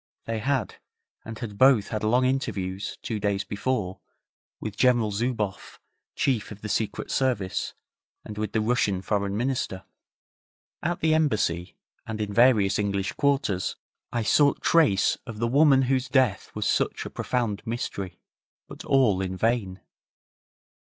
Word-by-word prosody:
They 115 -1 -2
had, 130 -1 -1 0.5
and 110 0 -8
had 105 -5 -7
both 130 -6 +5
had 110 -1 -3
long 125 +4 +3
interviews, 100 -8 -2
two 110 -2 -3
days 100 -1 0
before, 105 -3 -2 0.6
with 105 -2 -5
General 120 -2 +3
Zouboff, 105 -2 -3 0.4
Chief 125 -6 0
of 105 -1 -10
the 105 - -4
Secret 105 -1 -2
Service, 120 -8 -1 0.5
and 105 - -7
with 105 -1 -3
the 110 - +2
Russian 105 -5 +1
Foreign 100 -1 -1
Minister. 120 -6 -2 1.0
At 175 +1 -2
the 160 0 +3
Embassy, 105 - 0 0.3
and 110 -1 -4
in 105 -1 -3
various 115 -5 +4
English 100 -1 -1
quarters, 140 -10 0 0.4
I 120 -1 -1
sought 145 +6 +3
trace 150 -13 +3
of 115 -2 -7
the 115 - 0
woman 135 +1 +5
whose 130 0 0
death 130 -7 +2
was - - -2
such - - 0
a - - -6
profound 115 -5 -2
mystery, 100 -5 -4 0.5
but - - -10
all 125 -9 +3
in 95 -1 -3
vain. 110 -4 0
110 Hz, 145 wpm, -26 LUFS, 100-130 Hz, 1.0 s, both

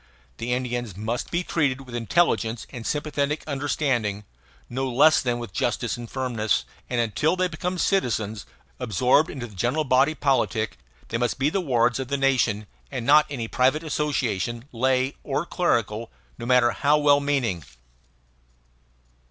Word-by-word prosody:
The 115 +2 -3
Indians 120 -5 -2
must 110 +4 -3
be 175 +1 -1
treated 140 -6 0
with 125 -2 -12
intelligent 120 -2 +1
and 120 -4 -6
sympathetic 150 0 -1
understanding, 135 -8 -1 0.4
no 130 +2 -2
less 155 +6 +5
than 120 -1 0
with 120 -5 -7
justice 120 +1 -1
and 120 -1 -8
firmness; 120 -5 -1 0.2
and 125 - 0
until 120 - +1
they 185 0 +1
become 180 +2 -3
citizens, 110 - 0 0.3
absorbed 125 - +3
into 130 -4 -5
the 110 - -12
general 125 - 0
body 135 +3 +3
politic, 120 - 0 0.3
they 115 - -1
must 120 -1 0
be 140 +3 +1
the 195 - 0
wards 125 -5 +2
of 130 - -3
the 140 +1 -1
nation, 125 -6 +1 0.2
and 125 -4 -4
not 150 +3 +6
of - - -20
any 120 -4 -3
private 130 +7 +2
association, 125 - -1
lay 130 +2 +1
or 145 +3 -1
clerical, 115 - 0 0.3
no 120 - -5
matter 125 -1 +4
how 150 +1 +2
well 145 -1 +5
meaning. 130 - 0
130 Hz, 155 wpm, -25 LUFS, 115-145 Hz, 0.4 s, not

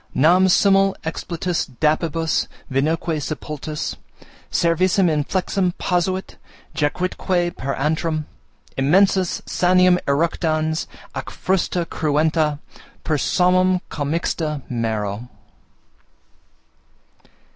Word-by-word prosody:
Nam 180 +7 +5
simul 195 +1 +4
expletus 170 +2 -2
dapibus, 160 +1 +1 0.2
vinoque 155 +3 0
sepultus 150 0 -5 0.5
Cervicem 180 +2 +2
inflexam 180 +4 0
posuit, 185 +1 -1 0.4
jacuitque 175 +3 -1
per 135 +1 -3
antrum 155 +2 -1 0.5
Immensus, 185 +6 +2
saniem 180 0 +4
eructans, 155 +1 0 0.3
ac - - -4
frusta 180 -2 -1
cruenta 155 -1 +1 0.5
Per 155 - 0
somnum 185 +3 +3
commixta 150 -1 -2
mero. 110 -1 -3
165 Hz, 75 wpm, -21 LUFS, 150-180 Hz, 0.5 s, Nam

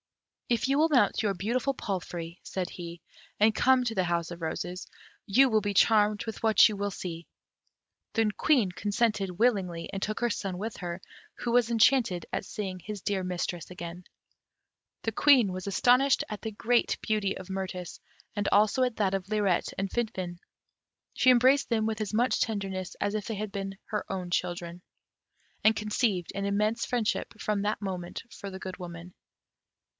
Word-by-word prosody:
"If 240 +1 +1
you 275 +2 +2
will 320 +1 +4
mount 270 -5 +3
your 205 -2 +1
beautiful 235 +9 -1
palfrey," 175 -6 -5
said 185 -2 -4
he, 170 -1 -8 0.4
"and 215 +1 +4
come 260 +1 +4
to 225 -2 -1
the 185 - +2
House 170 -1 -1
of 170 0 -8
Roses, 180 +3 -4 0.4
you 260 +7 +6
will 220 -3 +2
be 205 0 -2
charmed 210 0 +4
with 225 0 -6
what 220 -1 +7
you 215 - -3
will 200 0 -2
see." 170 -3 -6 0.9
The 225 -2 +2
Queen 245 -12 +3
consented 210 +1 0
willingly, 190 -8 +1
and 195 - -3
took 215 +1 -2
her 240 - +1
son 195 -4 -3
with 220 +4 -5
her, 175 0 -5 0.3
who 240 - -3
was 240 -1 +3
enchanted 225 -6 +3
at - - -1
seeing 190 -4 -5
his 205 +2 -7
dear 195 -2 -1
mistress 175 -2 -3
again. 175 0 -7 1.0
The 225 - -1
Queen 250 -7 +5
was 185 +1 -6
astonished 250 +7 +4
at 210 - -5
the 220 - -4
great 235 +3 +1
beauty 210 -3 0
of 185 - -9
Mirtis, 185 -2 -5 0.4
and 205 -1 0
also 215 +5 +4
at 250 -3 -1
that 195 -3 +1
of 195 0 -2
Lirette 205 -5 +1
and 195 0 -1
Finfin. 185 -7 -3 0.7
She 255 - +4
embraced 255 +3 +5
them 220 -2 +1
with 220 0 -2
as 215 0 -3
much 245 +4 +2
tenderness 195 -4 -2
as 205 0 0
if 210 -1 -2
they 225 - -3
had 210 0 -4
been 195 -1 -3
all 195 - -24
her - - -9
own 180 -2 -4
children, 175 -1 -2 0.8
and 220 +1 +5
conceived 210 -4 0
an 200 - -2
immense 210 +3 +1
friendship 230 -2 -1
from 210 -2 -1
that 210 +1 -1
moment 180 -3 -4
for 200 - -7
the 190 0 -8
Good 185 0 -6
Woman. 175 -1 -9
205 Hz, 180 wpm, -29 LUFS, 185-225 Hz, 1.0 s, what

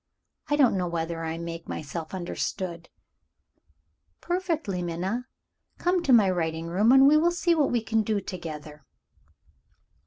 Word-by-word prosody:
I 290 - +2
don't 270 -8 +4
know 180 - -1
whether 165 -1 -3
I 160 0 -3
make 165 0 -7
myself 155 +3 -5
understood?" 175 -1 -4 1.3
"Perfectly, 330 - -2
Minna. 185 +9 -3 0.5
Come 360 0 +1
to 280 - +1
my 225 -5 +6
writing 165 -3 -1
room, 195 +7 +3
and 270 +1 +7
we 300 +2 +6
will 335 +3 +4
see 345 0 +1
what 300 -4 +2
we 240 -2 0
can 225 0 +1
do 215 -1 0
together." 155 -6 -8
190 Hz, 145 wpm, -26 LUFS, 165-270 Hz, 1.3 s, and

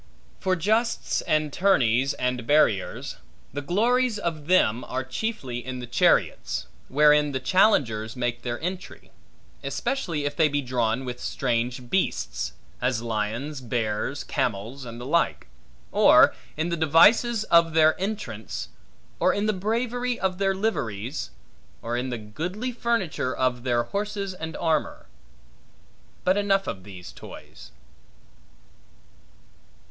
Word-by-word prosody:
For 185 -1 +1
justs, 220 +7 0
and 155 -1 +1
tourneys, 135 - +3
and 125 -2 -2
barriers; 130 -10 +2 0.4
the 145 - -3
glories 230 - +2
of 160 -6 -4
them 125 -10 +3
are 130 +1 -3
chiefly 130 - -4
in 130 0 -5
the 125 - -6
chariots, 120 +1 +1 0.2
wherein 150 +1 +4
the 130 - -1
challengers 130 - +2
make 120 -1 -2
their 120 -1 -3
entry; 180 - -6 0.5
especially 165 - -2
if 145 0 -2
they 160 0 +4
be 145 0 -1
drawn 120 0 0
with 125 -1 -5
strange 125 0 -2
beasts: - - -1 0.3
as 125 -2 0
lions, 115 +6 -3
bears, 115 -4 -2
camels, 115 +7 -3
and 115 0 -8
the 120 - -7
like; 170 +5 +1 0.5
or - - +6 0.2
in 160 +2 -1
the 170 - 0
devices 205 +9 +5
of 170 -5 +4
their 155 -1 +6
entrance; 130 - -4 0.5
or - - +4
in 205 - -1
the 215 - +2
bravery 235 +5 -1
of 190 -1 -1
their 195 -1 +2
liveries; 135 - -2 0.5
or 115 +1 -2
in 125 +2 -2
the 120 - -3
goodly 175 - -4
furniture 195 - -1
of 125 -1 0
their 120 -1 +1
horses 200 - -3
and 160 -3 -6
armor. 160 -2 -1 1.2
But 185 +2 +3
enough 195 -1 +2
of 95 -1 -5
these 90 -4 -10
toys. - - -12
145 Hz, 130 wpm, -25 LUFS, 120-190 Hz, 1.2 s, or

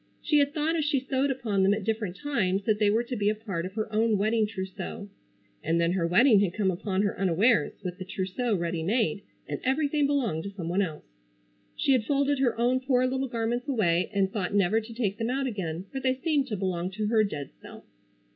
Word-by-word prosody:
She 300 - +3
had 285 0 +2
thought 315 +2 0
as 320 - +1
she 290 -2 +1
sewed 265 +1 0
upon 225 -7 -1
them 195 +2 +4
at 215 - -5
different 215 -4 -2
times 200 -6 -1
that 210 +1 +1
they 210 -2 +4
were 225 +3 +2
to 245 +1 -5
be 205 -2 +1
a 215 - 0
part 195 -6 -4
of 190 - -12
her 215 -1 -1
own 220 0 +2
wedding 215 +2 +2
trousseau. 195 0 -6 0.5
And 165 +1 +1
then 170 0 +2
her 180 -2 0
wedding 210 +5 +5
had 195 -3 0
come 200 -3 +1
upon 190 +2 -1
her 205 - 0
unawares, 195 +5 +3
with 180 0 -5
the 185 - -5
trousseau 190 +5 -2
ready 170 -2 -2
made, 200 0 0 0.3
and - - -4
everything 285 +2 +1
belonged 235 - 0
to - - -3
some 185 -4 -6
one 185 +3 +1
else. 160 -6 -4 0.7
She - - +1
had 255 -4 +3
folded 280 +2 +1
her 245 -4 +1
own 250 +2 +2
poor 255 -1 +2
little 265 +1 -1
garments 240 +2 -2
away 185 -10 +1
and 195 -2 +1
thought 200 -2 -2
never 205 +3 +3
to 220 +2 -11
take 215 -4 -2
them 225 +1 -1
out 270 +2 -1
again, 185 -7 -4
for 270 - -3
they 260 -1 +1
seemed 285 0 0
to 210 - -3
belong 185 -2 -2
to 215 +2 -2
her 215 0 +3
dead 150 -9 -4
self. - - -12
215 Hz, 230 wpm, -27 LUFS, 190-255 Hz, 0.7 s, wedding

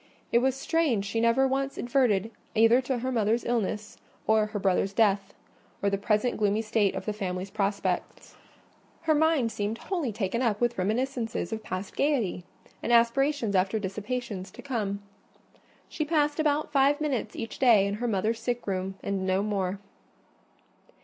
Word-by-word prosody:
It 235 - +5
was 260 +1 +1
strange 270 -8 +1
she 225 +3 -1
never 235 +3 +4
once 270 +1 -1
adverted 240 -5 +1 0.2
either 225 +3 +5
to 260 0 -2
her 255 +2 -2
mother's 225 0 +1
illness, 215 -2 -2 0.3
or 220 -1 +3
her 210 0 -5
brother's 195 0 +1
death, 200 -2 +2 0.5
or 200 - +2
the 200 - +1
present 210 +3 +1
gloomy 210 +1 +1
state 215 -2 +1
of - - -5
the 215 - -1
family 185 -3 -3
prospects. 200 0 -2 0.7
Her 320 -1 +2
mind 305 -6 +2
seemed 210 +2 -2
wholly 335 - -2
taken 210 +2 -2
up 220 -5 +1
with 240 -3 0
reminiscences 225 0 -1
of 220 - -4
past 185 -1 -5
gaiety, 240 -12 0 0.4
and - - -2
aspirations 235 0 +3
after 190 +3 +2
dissipations 210 0 -4
to - - -12
come. 205 -7 -2 0.8
She 310 - -3
passed 300 -1 +1
about 300 -1 +1
five 285 +1 +3
minutes 270 -8 -2
each 225 - -6
day 230 -7 +6
in 200 - -1
her 245 - 0
mother's 220 +2 0
sick 245 -1 -2
room, 190 -1 -2
and 195 -1 -2
no 190 +1 +2
more. 195 -2 -1
225 Hz, 165 wpm, -28 LUFS, 200-260 Hz, 0.8 s, day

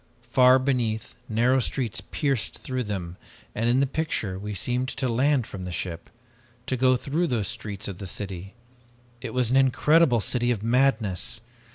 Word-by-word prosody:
Far 130 +1 +6
beneath 125 -5 -1 0.2
narrow 120 +4 +3
streets 125 -2 -1
pierced 135 -7 -1
through 130 -2 -3
them 90 -4 -5 0.4
and 115 +2 0
in 125 +3 +3
the - - +4
picture 130 -10 -2
we 105 +1 -5
seemed 125 +5 0
to 130 -1 -2
land 130 +1 +2
from 95 -3 -8
the 90 - -5
ship, 85 0 -5 0.6
to 130 - -1
go 130 0 +4
through 155 +7 -1
those 110 - -1
streets 100 -2 -5
of 95 -3 -6
the 100 - -5
city. 95 +1 -6 0.7
It - - -5
was 125 -2 0
an 130 - +4
incredible 135 +1 +4
city 120 +3 0
of 110 -4 -1
madness! 115 -4 +1
120 Hz, 170 wpm, -25 LUFS, 105-130 Hz, 0.7 s, Far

